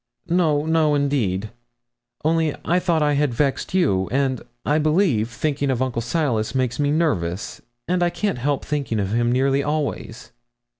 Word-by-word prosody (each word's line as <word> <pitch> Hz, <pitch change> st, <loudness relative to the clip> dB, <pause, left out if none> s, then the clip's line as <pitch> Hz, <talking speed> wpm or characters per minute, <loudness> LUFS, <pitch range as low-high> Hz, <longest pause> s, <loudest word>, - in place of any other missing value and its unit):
'No, 160 Hz, -4 st, +2 dB
no, 160 Hz, -2 st, +2 dB
indeed 110 Hz, -9 st, 0 dB, 0.7 s
only 160 Hz, -1 st, +2 dB
I 175 Hz, +3 st, +2 dB
thought 170 Hz, -4 st, +1 dB
I 150 Hz, 0 st, +2 dB
had 145 Hz, -4 st, +1 dB
vexed 140 Hz, +6 st, -1 dB
you; 95 Hz, -, +2 dB
and, 135 Hz, -1 st, 0 dB, 0.2 s
I 150 Hz, +2 st, +2 dB
believe, 155 Hz, -, +2 dB
thinking 140 Hz, +3 st, -1 dB
of 130 Hz, -3 st, 0 dB
Uncle 130 Hz, -3 st, -1 dB
Silas 120 Hz, -3 st, -1 dB
makes 130 Hz, -1 st, 0 dB
me 145 Hz, -1 st, +2 dB
nervous, 110 Hz, -, -1 dB, 0.3 s
and 180 Hz, +1 st, 0 dB
I 175 Hz, -, +3 dB
can't 200 Hz, -5 st, -2 dB
help 140 Hz, +2 st, -1 dB
thinking 140 Hz, -7 st, -2 dB
of 100 Hz, 0 st, -1 dB
him 120 Hz, +1 st, +2 dB
nearly 135 Hz, +2 st, +2 dB
always.' 145 Hz, -5 st, -3 dB
145 Hz, 160 wpm, -22 LUFS, 120-155 Hz, 0.7 s, I